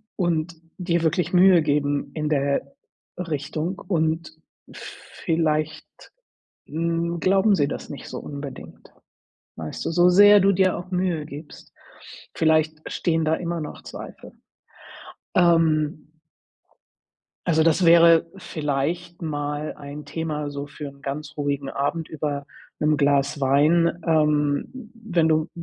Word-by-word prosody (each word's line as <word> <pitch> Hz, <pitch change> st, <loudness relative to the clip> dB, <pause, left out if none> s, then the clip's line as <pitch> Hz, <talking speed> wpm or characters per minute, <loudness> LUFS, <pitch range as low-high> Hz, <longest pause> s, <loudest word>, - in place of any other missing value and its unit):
und 170 Hz, -2 st, -1 dB, 0.2 s
dir 170 Hz, -2 st, 0 dB
wirklich 170 Hz, +2 st, 0 dB
Mühe 180 Hz, -1 st, +6 dB
geben 145 Hz, -1 st, 0 dB
in 150 Hz, -1 st, -2 dB
der 140 Hz, -1 st, -1 dB, 0.4 s
Richtung. 160 Hz, +1 st, -3 dB
Und 160 Hz, -3 st, -1 dB, 0.4 s
vielleicht, 155 Hz, -1 st, -3 dB, 0.6 s
hm, 170 Hz, +1 st, -2 dB
glauben 195 Hz, +4 st, +3 dB
sie 145 Hz, -4 st, +1 dB
das -, -, -6 dB
nicht 145 Hz, -, -8 dB
so -, -, -6 dB
unbedingt, 140 Hz, -2 st, -9 dB, 0.6 s
weißt 80 Hz, -1 st, -6 dB
du, -, -, -1 dB
so 175 Hz, +1 st, +5 dB
sehr 205 Hz, +3 st, +7 dB
du 195 Hz, +1 st, +4 dB
dir 190 Hz, -1 st, +2 dB
auch 180 Hz, +1 st, -9 dB
Mühe 180 Hz, -4 st, -1 dB
gibst. 150 Hz, +1 st, -11 dB, 0.6 s
Vielleicht 155 Hz, -1 st, +1 dB
stehen 165 Hz, -2 st, 0 dB
da 155 Hz, +1 st, +2 dB
immer 170 Hz, -1 st, -3 dB
noch 150 Hz, -, -7 dB
Zweifel, -, -, -10 dB, 1.0 s
ähm 160 Hz, -4 st, +3 dB, 1.4 s
Also, 160 Hz, -1 st, +3 dB
das 165 Hz, +3 st, +3 dB
wäre 165 Hz, 0 st, +6 dB
vielleicht 170 Hz, +2 st, -3 dB
mal 145 Hz, -1 st, -3 dB
ein 145 Hz, 0 st, -9 dB
Thema, 150 Hz, -1 st, -4 dB
so 140 Hz, 0 st, -6 dB
für 150 Hz, 0 st, -8 dB
'n 140 Hz, 0 st, -18 dB
ganz 145 Hz, +2 st, -5 dB
ruhigen 140 Hz, -1 st, -2 dB
Abend 155 Hz, +4 st, -2 dB
über 145 Hz, -2 st, -4 dB, 0.3 s
'nem 150 Hz, 0 st, +2 dB
Glas 140 Hz, 0 st, +1 dB
Wein, 155 Hz, +6 st, +3 dB
ähm, 150 Hz, -, 0 dB
wenn 185 Hz, -8 st, 0 dB
du 155 Hz, +1 st, +1 dB
155 Hz, 125 wpm, -23 LUFS, 145-170 Hz, 1.4 s, sehr